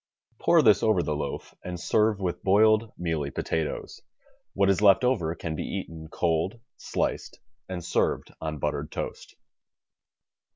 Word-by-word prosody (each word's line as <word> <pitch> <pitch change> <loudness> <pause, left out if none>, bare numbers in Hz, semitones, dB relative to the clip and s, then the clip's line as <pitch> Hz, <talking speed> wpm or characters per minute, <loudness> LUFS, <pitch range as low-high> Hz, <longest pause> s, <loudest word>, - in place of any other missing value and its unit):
Pour 165 -3 +4
this 105 -4 +5
over 105 -6 +3
the 75 - -1
loaf 75 - -5
and 90 -1 -5
serve 105 +3 +2
with 90 -3 -2
boiled 110 +3 +4
mealy 80 -5 -2
potatoes. 80 +2 -3 0.5
What 100 0 +2
is 95 - 0
left 100 -1 +6
over 90 -11 +1
can 80 -2 -4
be - - -4
eaten 80 -5 -6
cold, 85 +7 -1 0.2
sliced - - -3 0.3
and 90 -2 -5
served - - 0
on 80 -1 -3
buttered, 75 0 -3
toast. - - -6
90 Hz, 140 wpm, -27 LUFS, 80-105 Hz, 0.5 s, left